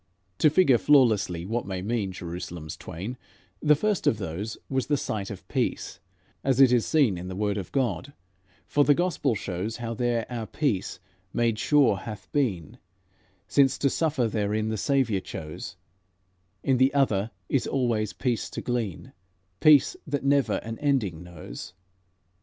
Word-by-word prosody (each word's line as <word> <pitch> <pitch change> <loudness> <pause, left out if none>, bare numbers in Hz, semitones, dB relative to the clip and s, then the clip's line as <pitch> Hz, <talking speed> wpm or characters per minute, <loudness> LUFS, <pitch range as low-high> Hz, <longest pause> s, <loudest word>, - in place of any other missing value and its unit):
"To 155 - +6
figure 145 -6 +4
flawlessly 110 - +3
what 115 +3 -2
may 95 -1 -4
mean 105 -2 -1
Jerusalems 85 -3 -6
twain: 105 +10 -7 0.4
the 150 -1 +5
first 210 +5 0
of 110 - +3
those 100 +3 -5
Was 130 -2 -1
'the 145 0 +2
Sight 105 -6 -3
of 100 - -9
Peace' - - -2 0.4
as 135 -1 +1
it 135 -3 +7
is 120 -2 +2
seen 135 - +3
In 90 - -6
the 95 - -5
word 105 0 0
of 100 -4 -5
God, 130 - -1 0.5
for 145 - +3
the 145 0 +5
gospel 150 -8 0
shows 100 +3 -4
How 115 -1 -4
there 120 -1 0
our 115 -3 -5
peace 105 -12 -1 0.3
made 115 -2 +1
sure 140 -8 +4
hath 105 +1 -8
been, 115 - -1 0.7
Since 135 +4 +3
to 140 - +1
suffer 150 -7 +1
therein 110 0 -1
the 110 - -1
Saviour 120 -4 +1
chose; 75 -4 -7 0.9
In 135 -2 +2
the 130 +2 +4
other 110 -7 +2 0.2
is 135 - 0
always 115 -5 0
peace 125 -4 -2
to - - -5
glean, 115 -8 -3 0.5
Peace 150 -3 +6
that 145 -2 -2
never 140 -1 +3
an 115 0 -6
ending 120 - 0
knows. 90 -1 -9
115 Hz, 160 wpm, -26 LUFS, 100-135 Hz, 0.9 s, it